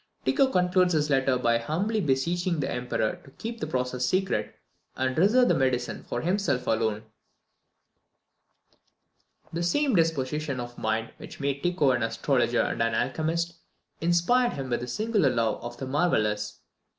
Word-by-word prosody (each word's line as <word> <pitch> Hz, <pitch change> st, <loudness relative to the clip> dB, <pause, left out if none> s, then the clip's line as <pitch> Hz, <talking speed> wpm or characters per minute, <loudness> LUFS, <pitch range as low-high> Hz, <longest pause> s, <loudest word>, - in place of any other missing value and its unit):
Tycho 275 Hz, -, +3 dB
concludes 180 Hz, -5 st, +2 dB
his 150 Hz, -1 st, +1 dB
letter 135 Hz, -1 st, +3 dB
by 115 Hz, -2 st, +2 dB
humbly 195 Hz, -, -1 dB
beseeching 170 Hz, +4 st, 0 dB
the 135 Hz, -, -1 dB
Emperor 125 Hz, -3 st, -2 dB
to -, -, -15 dB
keep 230 Hz, -, -7 dB
the -, -, -3 dB
process 125 Hz, 0 st, -2 dB
secret, 155 Hz, -, 0 dB, 0.4 s
and 130 Hz, 0 st, -1 dB
reserve 220 Hz, +9 st, +4 dB
the -, -, +4 dB
medicine 130 Hz, -2 st, 0 dB
for -, -, -4 dB
himself 175 Hz, -7 st, 0 dB
alone! 110 Hz, -1 st, 0 dB, 2.5 s
The 170 Hz, -, -2 dB
same 265 Hz, +11 st, +1 dB
disposition 150 Hz, -4 st, 0 dB
of 120 Hz, 0 st, -6 dB
mind 110 Hz, +1 st, -1 dB
which -, -, -11 dB
made 140 Hz, 0 st, -1 dB
Tycho 175 Hz, -6 st, +2 dB
an 120 Hz, -1 st, 0 dB
astrologer 120 Hz, +2 st, +1 dB
and -, -, -1 dB
an 115 Hz, -1 st, +1 dB
alchemist, 170 Hz, +6 st, -1 dB, 0.4 s
inspired 175 Hz, +9 st, +3 dB
him 135 Hz, -2 st, -5 dB
with 120 Hz, -, 0 dB
a 125 Hz, -, -5 dB
singular 210 Hz, -, +1 dB
love 115 Hz, -3 st, 0 dB
of 120 Hz, 0 st, -7 dB
the 135 Hz, -, -5 dB
marvellous. 105 Hz, -8 st, 0 dB
140 Hz, 150 wpm, -27 LUFS, 125-175 Hz, 2.5 s, reserve